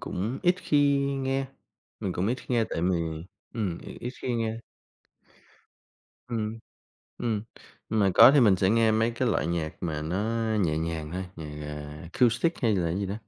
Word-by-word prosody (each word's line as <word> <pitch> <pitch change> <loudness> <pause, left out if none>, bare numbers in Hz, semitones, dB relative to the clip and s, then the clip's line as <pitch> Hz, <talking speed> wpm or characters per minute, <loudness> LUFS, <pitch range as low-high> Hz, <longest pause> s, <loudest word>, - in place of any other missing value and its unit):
cũng 110 +8 -3
ít 180 -1 +4
khi 145 -5 +3
nghe 135 -1 -1 0.5
mình 95 - -2
cũng 90 +2 -1
ít 120 - +1
khi - - -15
nghe 115 -2 +3
tại - - -2
vì 90 0 +2 0.6
ừm, 100 -7 -2
mình - - -10
ít 125 - -4
khi 125 - -1
nghe. 115 -1 -1 1.7
Ừm. 110 -1 -3 0.6
Ừm, 110 -4 -1 0.5
mà 105 -3 +2
có - - +10
thì 145 - +6
mình 105 -6 +5
sẽ 95 +1 +2
nghe 115 0 +4
mấy 110 +2 +2
cái 120 +1 -1
loại 95 - +1
nhạc 85 -2 -2
mà 80 -3 -2
nó 110 +8 -1
nhẹ 80 -4 +1
nhàng 80 -1 -3
thôi, 95 +1 -3
nhạc, 75 -1 -7
à, 75 0 -7
acoustic 125 +7 +2
hay 110 -4 +3
là 90 -2 0
cái 90 - -1
gì 100 - -1
đó, 95 - -3
110 Hz, 185 wpm, -27 LUFS, 85-120 Hz, 1.7 s, có